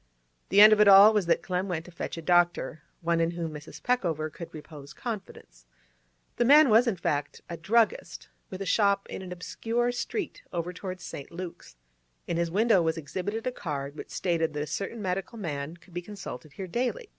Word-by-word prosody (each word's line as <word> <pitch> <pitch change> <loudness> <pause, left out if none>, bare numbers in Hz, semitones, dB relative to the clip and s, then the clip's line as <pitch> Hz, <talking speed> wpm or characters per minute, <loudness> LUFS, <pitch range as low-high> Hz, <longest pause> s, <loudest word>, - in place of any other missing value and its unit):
The 200 - +6
end 215 +1 +10
of 210 - +4
it 210 - +6
all 200 +2 +9
was 205 -5 +1
that 170 - +2
Clem 185 +1 -2
went 170 -3 -3
to 180 - -12
fetch 170 - -5
a 165 - -7
doctor; 175 -4 +2 0.2
one 170 0 +1
in 165 - +2
whom 170 -2 -4
Mrs. 150 -1 -10
Peckover 165 -11 0
could 170 - -9
repose 150 -2 -11
confidence. 190 - -8 0.7
The - - +3
man 290 +3 +7
was, 230 +3 +6
in 225 - +1
fact, 145 -4 -2
a 170 - -5
druggist, 215 +7 0 0.2
with 190 +1 -5
a - - -7
shop 200 +1 +2
in - - -5
an 185 -1 -8
obscure 230 +7 -2
street 345 - -4
over 175 +1 -3
towards 185 -1 -7
St. 140 - -8
Luke's; 170 - -8 0.5
in 170 - -2
his 170 0 0
window 205 +1 +3
was 160 0 0
exhibited 190 +8 -4
a 255 - 0
card 145 - -5
which - - -9
stated 165 -3 -1
that 150 0 -2
a - - -4
certain 195 +8 -4
medical 190 +4 -3
man 155 -4 -5
could 175 +1 -21
be 175 - -3
consulted 170 -8 -9
here 190 - -6
daily. 255 - -2
180 Hz, 205 wpm, -28 LUFS, 165-210 Hz, 0.7 s, end